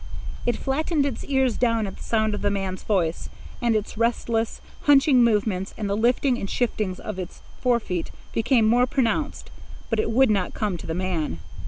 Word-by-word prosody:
It 240 - +1
flattened 290 +2 0
its 270 -5 -3
ears 265 -4 +1
down 230 -3 +2
at 195 - -6
the - - -10
sound 220 -1 +1
of 210 - -3
the 205 - +2
man's 195 -2 -3
voice, 175 -6 -1 0.3
and 235 -2 +2
its 215 0 -3
restless, 230 -1 0 0.3
hunching 275 -3 +6
movements 210 -4 +1
and 210 - -2
the 200 - 0
liftings 245 +3 +2
and 195 - -4
shiftings 215 -6 -1
of 210 -3 -6
its 180 -1 -7 0.2
forefeet 230 -9 0 0.2
became 230 0 +3
more 245 +3 +4
pronounced 265 +3 -1 0.4
but 225 - +1
it 215 - +1
would 245 +1 +4
not 195 -4 0
come 210 -4 -1
to - - -9
the 160 - -2
man. 175 - -2
225 Hz, 185 wpm, -24 LUFS, 200-245 Hz, 0.4 s, hunching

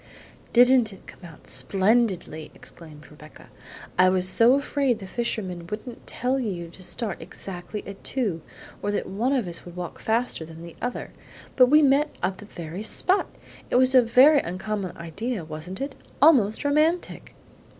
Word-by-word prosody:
"Didn't 245 -2 +5
it 195 - -14
come - - -14
out 165 -3 -13
splendidly?" 185 - 0
exclaimed 150 -3 -13
Rebecca. 150 +1 -15 0.5
"I 185 0 +7
was 185 0 +2
so 230 +6 +5
afraid 280 -3 0
the 200 - -9
fishman 185 -5 -4
wouldn't 220 +5 -8
tell 255 +2 -1
you 180 -8 -4
to 180 - -15
start 205 +2 -4
exactly 180 +3 -7
at 200 0 -10
two, 210 -11 -2 0.4
or 205 - -2
that 205 - -1
one 225 +7 -1
of 255 -8 0
us 170 -1 -4
would 175 -1 -11
walk 180 -1 -6
faster 225 -5 -1
than 160 +1 -11
the 170 -1 -10
other; 245 0 -4 0.4
but 255 -1 +7
we 300 +3 +6
met 285 +2 +4
at 190 0 -1
the 210 - -10
very 170 -1 -7
spot! 370 - 0 0.4
It - - -1
was 255 +1 +4
a 255 - +8
very 255 +6 +6
uncommon 190 -1 -4
idea, 180 +4 -4
wasn't 160 +4 -7
it? 275 0 -3 0.3
Almost 260 -6 +4
romantic!" 310 +4 0
210 Hz, 165 wpm, -25 LUFS, 175-250 Hz, 0.5 s, a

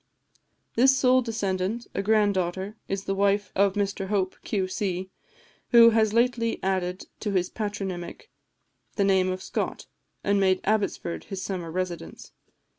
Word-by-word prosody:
This 265 +3 +5
sole 255 0 +4
descendant, 215 -1 -2
a - - -1
grand 210 0 +3
daughter, 190 +3 -2
is 195 0 -3
the 195 - -1
wife 200 0 +1
of 195 0 +3
Mr 200 -1 -1
Hope, 190 -2 0
Q.C., 190 -1 -2 0.6
who 230 -1 +8
has 220 -1 +3
lately 230 0 +1
added 185 -1 -1
to 210 - -3
his 180 -1 0
patronymic 195 -5 -5 0.6
the 200 - +2
name 190 -1 +3
of 185 0 -5
Scott, - - -3 0.4
and 200 0 +2
made 190 -1 +3
Abbotsford 205 -5 -1
his 195 -2 -5
summer 180 -4 -4
residence. 180 0 -5
195 Hz, 140 wpm, -26 LUFS, 185-215 Hz, 0.6 s, who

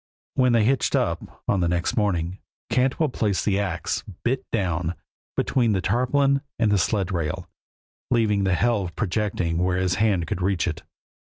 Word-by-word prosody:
When 125 -2 +3
they 115 -2 +4
hitched 135 +3 +2
up, - - -2
on 100 - +2
the 85 - +2
next 85 0 0
morning, 95 -4 0 0.3
Cantwell 135 +4 +2
placed 105 -6 0
the 100 -2 +2
ax, 95 -5 -2 0.2
bit 130 +2 0
down, 90 -5 -1 0.4
between 120 -5 +2
the 95 - +1
tarpaulin 135 +7 +2 0.2
and 115 -3 +2
the 100 - +3
sled 100 -1 0
rail, 85 +1 -2 0.6
leaving 110 -4 +2
the 95 -2 +2
helve 100 -6 0
projecting 95 -5 -1
where 90 0 +1
his 95 0 +1
hand 100 -6 +2
could 85 - -3
reach 95 -1 +1
it. - - -3
100 Hz, 165 wpm, -24 LUFS, 90-115 Hz, 0.6 s, they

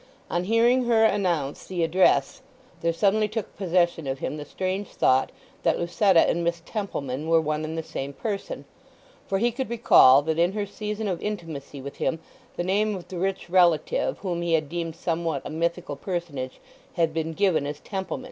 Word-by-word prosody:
On 175 +1 0
hearing 235 +4 +3
her 225 -2 +4
announce 175 -10 0
the 180 -3 -1
address 165 - +3 0.4
there 170 - +2
suddenly 205 +5 +2
took 215 0 -5
possession 175 -4 +1
of 135 0 -2
him 150 - -4
the 150 - -6
strange 190 +5 -3
thought 130 +1 +2 0.3
that - - +2
Lucetta 175 +1 +3
and 170 - 0
Miss 170 0 -1
Templeman 155 - -4
were 165 0 +5
one 155 -1 -1
and 160 +1 -4
the 160 - -2
same 140 -2 -5
person, 205 - -5 0.6
for 195 - 0
he 240 +4 +2
could 255 +1 -4
recall 145 - +6
that 160 +1 -1
in 175 +3 +3
her 205 -1 -2
season 210 +1 -4
of 180 -4 -2
intimacy 165 -9 -5
with 140 +1 -8
him 165 - 0 0.4
the - - -2
name 205 +3 +1
of 180 - -9
the 180 - -5
rich 190 0 -2
relative 180 - +2
whom 175 -3 -3
he 170 -1 0
had 155 -3 +1
deemed 165 -1 -4
somewhat 165 -4 -2
a - - -5
mythical 170 +3 -2
personage 160 -9 -4 0.3
had 165 -2 +1
been 160 0 -2
given 160 -6 +2
as 145 0 -5
Templeman. 190 +2 -4
175 Hz, 185 wpm, -25 LUFS, 160-200 Hz, 0.6 s, recall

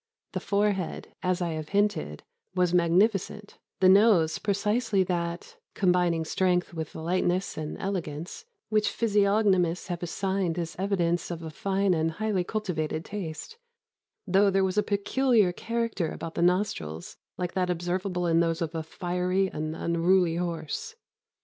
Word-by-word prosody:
The - - -2
forehead, 200 -3 -1
as 180 0 0
I 170 - -1
have 155 -1 -5
hinted, 205 +1 0 0.3
was 180 -1 +2
magnificent; 195 +4 +1 0.2
the 185 - +6
nose 190 -5 +5
precisely 210 0 +1
that 170 -1 -3 0.2
(combining 180 -3 +2
strength 180 +1 +1
with 160 -2 -5
lightness 180 +3 0
and 155 -1 -5
elegance) 175 - -4 0.2
which 215 -1 +2
physiognomists 200 -5 +2
have 175 -1 -3
assigned 190 0 -1
as 165 -1 -3
evidence 175 -3 0
of 170 -1 -5
a 160 - -6
fine 195 +3 +1
and 160 -1 0
highly 210 -1 0
cultivated 170 -6 -3
taste, 200 - -6 0.7
though 195 +1 +4
there 195 0 +2
was 190 0 0
a - - +5
peculiar 210 0 +2
character 230 -4 -2
about 165 0 -6
the - - -2
nostrils 175 - -1 0.2
like 180 -1 -3
that 180 -1 0
observable 180 +1 -1
in 165 -1 +3
those 165 -1 +1
of 165 0 -4
a 165 - -2
fiery 180 +3 -1
and 155 +1 -4
unruly 170 +1 +2
horse. 170 - -4
180 Hz, 145 wpm, -27 LUFS, 170-200 Hz, 0.7 s, the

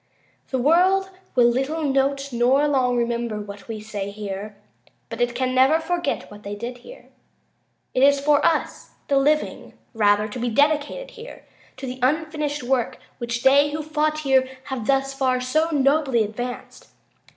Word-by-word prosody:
The 260 - -1
world 365 +8 +3 0.2
will 245 - +5
little 270 +7 0
note, 275 -1 0
nor 255 +5 +3
long 255 -4 +1
remember, 235 -2 -1
what 205 -1 -9
we 225 -2 -5
say 210 -2 -5
here, 205 0 -6 0.5
but 230 +1 -5
it 240 0 0
can 255 +1 -1
never 265 +5 +4
forget 345 -6 -2
what 205 0 -11
they 205 0 -6
did 240 +4 -6
here. - - -14 0.8
It 255 - +1
is 280 +1 +5
for 290 +1 +3
us 325 - -1 0.2
the 280 - +3
living, 300 +3 0 0.2
rather, 210 -1 +3
to 220 +4 -7
be 240 +1 -1
dedicated 300 - +1
here 475 0 -11 0.3
to 265 - -6
the 255 0 -6
unfinished 300 +1 -1
work 245 -1 0 0.2
which 235 -1 -3
they 280 +2 +5
who 305 +1 -4
fought 305 0 -1
here 265 -2 +2
have 265 -6 -5
thus 270 0 +1
far 260 -2 +1
so 310 +6 +1
nobly 275 -5 +2
advanced. 245 +4 -7
265 Hz, 160 wpm, -23 LUFS, 235-295 Hz, 0.8 s, will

